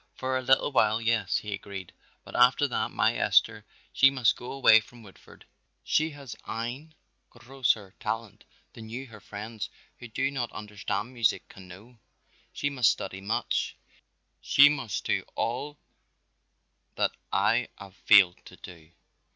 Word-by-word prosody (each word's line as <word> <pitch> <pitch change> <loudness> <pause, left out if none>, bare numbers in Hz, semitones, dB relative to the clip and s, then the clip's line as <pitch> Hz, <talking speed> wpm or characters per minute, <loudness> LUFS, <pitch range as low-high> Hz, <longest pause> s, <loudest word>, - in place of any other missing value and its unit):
"For 130 0 -2
a 130 - 0
little 130 +2 +3
while, 110 -4 +3
yes," 115 -4 +1
he 105 -1 -5
agreed, 100 -2 -8 0.3
"but - - -12
after - - +4
that - - -2
my - - +1
Esther - - +2 0.3
she 135 - +6
must 130 -4 +2
go 125 - -8
away 130 -5 +6
from 115 +1 -15
Woodford. 100 -2 -17 0.4
She 155 +1 +1
hast 140 -7 -10
ein 130 +8 -5 0.3
grosser 120 -6 -2
talent 110 -1 -5 0.3
than 110 -1 -11
you 125 +4 -6
her 110 -4 -13
friends 105 -1 -7 0.3
who 120 - -9
do 135 +5 -1
not 125 -4 -3
understand 105 +3 -5
music 115 -4 0
can 95 -1 -13
know. 110 +7 -14 0.5
She - - -2
must 130 -7 +3
study 95 - -4
much, 100 +3 -2 0.6
she 145 +1 +6
must 135 -8 -3
do - - 0
all 135 +6 -3 1.2
that - - +1 0.2
I - - +2
haf 100 -1 -12
failed 95 -4 +5
to - - -13
do. 85 -4 -13
115 Hz, 150 wpm, -27 LUFS, 105-130 Hz, 1.2 s, she